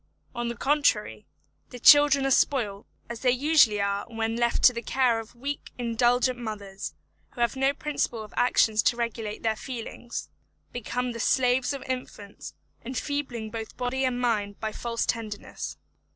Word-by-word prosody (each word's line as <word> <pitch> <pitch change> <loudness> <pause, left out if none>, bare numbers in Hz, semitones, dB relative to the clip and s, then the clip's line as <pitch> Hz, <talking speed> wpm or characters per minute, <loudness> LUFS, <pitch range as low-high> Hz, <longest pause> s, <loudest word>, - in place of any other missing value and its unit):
On 240 -1 -3
the 235 - -3
contrary, 290 +4 +1 0.4
the 250 - -9
children 280 +2 +7
are 270 - +1
spoiled, 215 -8 +1 0.2
as 235 -1 -6
they 255 - +2
usually 255 -4 +4
are 200 0 0
when 225 -1 -2
left 235 0 0
to 250 - +8
the 235 - -4
care 245 -1 +2
of 225 +1 -10
weak, 280 +4 -5
indulgent 245 +1 +1
mothers, 205 -4 -6 0.4
who 240 - -5
having 235 +3 +1
no 270 +1 +3
principle 280 -6 -2
of 210 - -13
action 235 -3 +3
to 235 +2 +3
regulate 225 -2 -4
their 220 -1 +1
feelings, 240 0 -6 0.4
become 245 +1 -3
the 230 - -7
slaves 250 +2 +2
of 275 - -5
infants, 250 -6 -7 0.3
enfeebling 255 -3 -3
both 225 -1 -7
body 250 +2 -1
and 255 -1 0
mind 210 -5 -1
by 220 -1 -3
false 230 +1 -2
tenderness. 215 -3 -4
240 Hz, 160 wpm, -27 LUFS, 225-260 Hz, 0.4 s, to